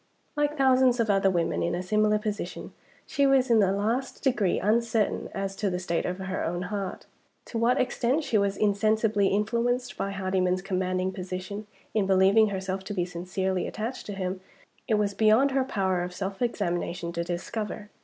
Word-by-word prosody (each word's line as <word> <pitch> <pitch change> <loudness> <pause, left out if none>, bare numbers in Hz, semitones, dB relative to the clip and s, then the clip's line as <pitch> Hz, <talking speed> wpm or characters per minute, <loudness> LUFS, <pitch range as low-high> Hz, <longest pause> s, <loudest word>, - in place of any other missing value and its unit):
Like 295 +1 0
thousands 260 -2 +4
of 225 -2 +2
other 195 -1 +3
women 170 -3 0
in 170 - 0
a 180 - -3
similar 215 +2 +2
position, 210 -1 -5 0.3
she 280 -1 +2
was 265 -2 +3
in 225 - +6
the 195 -2 +4
last 225 +7 -2
degree 225 -9 +2
uncertain 225 +1 +1
as 195 0 -3
to 205 - 0
the 180 - -2
state 170 -2 -1
of 180 0 -3
her 190 -1 -3
own 175 +2 -2
heart. 195 -3 -4 0.4
To 230 - -4
what 240 +3 +3
extent 255 +4 +1
she 235 - -2
was 200 -1 +2
insensibly 210 0 +2
influenced 235 +5 0
by 195 - -2
Hardyman's 185 -2 0
commanding 185 -1 -1
position 185 +2 -6 0.3
in 210 -3 +1
believing 195 +3 +5
herself 190 -1 -3
to 205 +1 -5
be 175 -2 0
sincerely 185 +1 -2
attached 230 +4 -5
to 205 - -4
him, 185 -1 -3 0.5
it 220 - +3
was 205 -1 +1
beyond 220 +7 +4
her 265 0 +2
power 190 -8 0
of 180 0 -5
self 195 +2 -4
examination 175 -6 -1
to 170 0 -1
discover. 205 +4 -5
200 Hz, 180 wpm, -27 LUFS, 185-225 Hz, 0.5 s, in